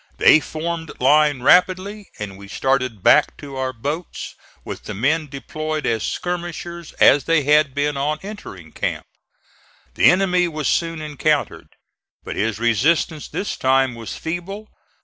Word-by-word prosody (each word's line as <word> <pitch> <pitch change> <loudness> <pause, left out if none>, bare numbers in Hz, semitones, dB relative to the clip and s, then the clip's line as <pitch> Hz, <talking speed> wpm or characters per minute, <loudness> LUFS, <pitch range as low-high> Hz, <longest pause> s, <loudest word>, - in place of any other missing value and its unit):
They 155 - +7
formed 160 +1 -5
line 145 0 +3
rapidly 185 +5 +3
and 105 -2 -6
we 100 +1 -12
started 130 -2 -1
back - - +4
to 140 -2 -9
our 130 0 -2
boats, 145 +8 -5 0.3
with - - -7
the 105 - -6
men 150 +8 +1
deployed 155 +2 -4
as 115 -2 0
skirmishers 175 +2 -4
as 145 - +5
they 165 -3 +2
had 150 -1 +3
been 145 +1 0
on 150 +2 0
entering 95 - -9
camp. - - -3 0.9
The - - +5
enemy 180 -1 +3
was 155 -3 -3
soon 165 -2 0
encountered, 150 0 -1 0.6
but - - -6
his 110 0 -1
resistance 135 - +1
this 200 - -4
time 130 -1 +2
was 115 -2 -7
feeble. 195 +6 -5
150 Hz, 145 wpm, -21 LUFS, 130-170 Hz, 0.9 s, They